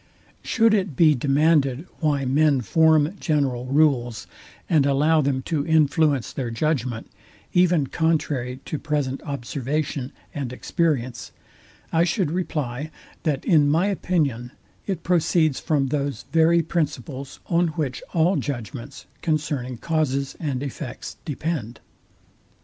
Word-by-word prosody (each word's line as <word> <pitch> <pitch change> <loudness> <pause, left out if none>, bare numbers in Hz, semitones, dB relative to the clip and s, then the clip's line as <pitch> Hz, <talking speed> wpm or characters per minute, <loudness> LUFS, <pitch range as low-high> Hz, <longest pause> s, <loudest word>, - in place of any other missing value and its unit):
Should 225 -1 +3
it 190 -8 0
be 155 +1 +6
demanded 145 +1 +2
why 145 -4 +1
men 140 +1 +3
form 160 - +3
general 135 -6 0
rules, 130 -5 +2 0.4
and 150 -5 +3
allow 150 +3 +3
them 135 -2 0
to 150 -1 -1
influence 155 -4 +2
their 130 -4 -3
judgment, 125 -2 -1 0.5
even 175 -4 +4
contrary 135 -5 -1
to 155 - -4
present 145 -3 -2
observation 140 0 -3 0.2
and 135 -5 -4
experience, 130 -4 -1 0.6
I 165 +1 +4
should 175 -2 0
reply, 150 -5 -3 0.3
that 150 -5 -1
in 150 -4 +4
my 165 +5 +3
opinion 145 - -1 0.3
it 190 -5 -3
proceeds 165 -4 +2
from 145 -5 0
those 140 -4 -2
very 165 +1 +4
principles, 140 -4 -3
on 175 0 +2
which 140 -5 -2
all 175 +2 +2
judgments 130 0 -5 0.2
concerning 145 -6 -1
causes 140 -3 -1
and 140 -4 -2
effects 130 -3 -6
depend. 145 -5 -3
145 Hz, 120 wpm, -23 LUFS, 130-160 Hz, 0.6 s, be